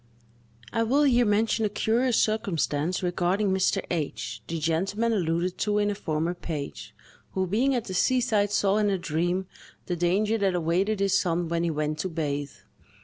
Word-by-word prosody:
I 230 - +1
will 265 +6 +3
here 245 -4 +4
mention 220 +2 +2
a 210 - +2
curious 230 +4 +1
circumstance 185 -6 0
regarding 180 +3 +1
Mr. 190 0 +1
H——, 160 -5 -3
the 165 - -3
gentleman 190 +9 0
alluded 175 -2 -1
to 210 -1 +1
in 205 0 +2
a - - -1
former 165 -2 -2
page, 155 -5 -6 0.4
who, 190 0 0
being 245 +9 +1
at 240 - -2
the 190 - -6
seaside, 220 -1 +2
saw, 205 -1 +2
in 210 -1 +2
a 195 - +1
dream, 175 +3 -1 0.4
the 175 - -2
danger 200 +6 +1
that 195 -2 +1
awaited 185 +5 0
his 195 -1 +2
son 170 -2 -1
when 170 0 0
he 170 - +1
went 155 -1 -2
to 185 - -2
bathe. 145 -3 -2
190 Hz, 175 wpm, -26 LUFS, 170-215 Hz, 0.4 s, here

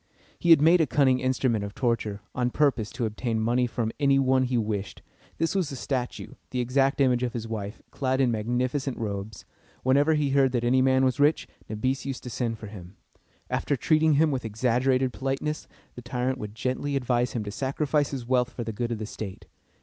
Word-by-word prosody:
He 170 - 0
had 160 -3 +8
made 165 +2 +6
a 155 - +2
cunning 130 -3 +3
instrument 130 -4 0
of 100 0 -6
torture, 115 -5 -1
on 125 -1 0
purpose 130 -6 +1
to 125 -2 -2
obtain 110 +1 -2
money 120 +3 +2
from 115 -1 -2
any 140 -2 +4
one 130 -1 +3
he 125 -1 0
wished. 105 -3 -3 0.3
This 165 0 0
was 185 -6 0
a - - -5
statue, 125 0 -4 0.2
the 125 - -3
exact 135 +3 +1
image 125 -3 +3
of 125 -1 -1
his 115 -2 -4
wife, 105 -1 -5
clad 130 -1 -1
in 130 -3 +3
magnificent 125 +4 -1
robes. 100 -2 -5 0.4
Whenever 145 +4 +4
he 145 -2 +1
heard 135 -2 +3
that 120 -1 0
any 130 +2 +3
man 130 0 +4
was 130 -2 +1
very 145 - +6
rich, 155 - -2 0.2
Nabis 130 +5 -1
used 135 -2 -5
to 125 - -7
send 115 -1 -2
for 110 - -9
him. 100 -3 -10 0.5
After 145 - 0
treating 155 +4 +3
him 155 +2 +3
with 130 -2 -2
exaggerated 125 +3 +1
politeness, 135 +3 -3 0.3
the 125 - -9
tyrant 125 +1 -2
would 105 0 -7
gently 130 +4 -2
advise 125 -2 0
him 115 - -2
to 105 - -5
sacrifice 140 +4 0
his 130 -4 -5
wealth 125 0 +2
for 120 - -6
the 115 -1 -4
good 120 +3 -3
of 115 - -1
the 110 - -4
state. 105 -2 -7
125 Hz, 210 wpm, -26 LUFS, 115-135 Hz, 0.5 s, had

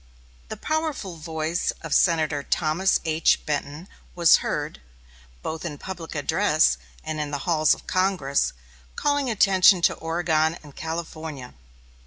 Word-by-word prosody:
The - - -6
powerful 310 - -3
voice 160 +2 -2
of 165 - -3
Senator 160 -4 +2
Thomas 165 +6 +1
H. 160 0 +2
Benton 150 +3 -3 0.3
was 170 -2 +6
heard, - - -4 0.6
both 160 0 -4
in 150 -4 -5
public 170 -1 -7
address 155 - +2 0.3
and 155 -1 -4
in 150 -1 -2
the 145 -1 -4
halls 155 -4 +3
of - - -17
Congress, 185 -7 +1 0.4
calling 285 -2 0
attention 195 -3 +5
to - - +4
Oregon 165 -1 0
and 145 -2 -14
California. 160 -5 -6
160 Hz, 130 wpm, -24 LUFS, 155-185 Hz, 0.6 s, was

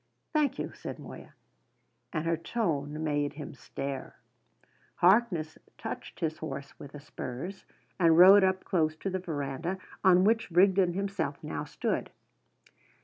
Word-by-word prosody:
"Thank 300 -2 +2
you," - - -4
said - - -7
Moya. - - -11 0.8
And 155 -3 -2
her 165 0 +2
tone 155 -5 -2
made 145 -2 0
him 150 -1 -8
stare. 135 0 -6 0.8
Harkness 180 -5 +3 0.2
touched - - -7
his 160 -1 -1
horse 140 -3 -6
with 140 - -10
the 145 - -8
spurs, 145 +5 -7 0.3
and 165 -2 +5
rode 190 +3 +9
up 185 0 +1
close 155 -4 +1
to 190 +4 -4
the 185 - -1
verandah, 165 +1 -3 0.3
on 185 -1 +6
which 225 +2 +2
Rigden 185 0 +4
himself 190 -7 -2
now - - -4
stood. - - -2
165 Hz, 140 wpm, -29 LUFS, 145-190 Hz, 0.8 s, rode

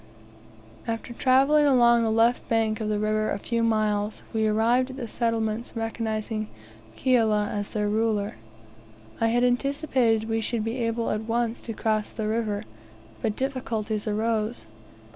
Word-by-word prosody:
After 230 +1 -4
travelling 275 +4 +4
along 240 -3 +5
the 225 - +1
left 230 +2 +2
bank 225 -1 +1
of 215 - -1
the 210 - 0
river 215 +1 0
a - - -1
few 230 +3 -2
miles, 215 -2 0
we 220 -1 +1
arrived 235 +4 +2
at 260 - -7
the 245 -4 -4
settlements 230 0 -1
recognizing 220 -1 -3 0.5
Kiala 220 -5 +2
as 205 -1 -3
their 210 -1 -1
ruler. 210 - 0 0.8
I 225 - +3
had 240 +2 +2
anticipated 250 -3 +1
we 225 0 0
should 225 0 -2
be 225 +3 -3
able 230 -1 -1
at 215 +1 -2
once 235 +1 -1
to 230 - -5
cross 215 -1 0
the 220 -2 -3
river, 215 -2 -1 0.6
but 210 - -1
difficulties 225 -5 -2
arose. 220 - -1
225 Hz, 150 wpm, -26 LUFS, 215-235 Hz, 0.8 s, along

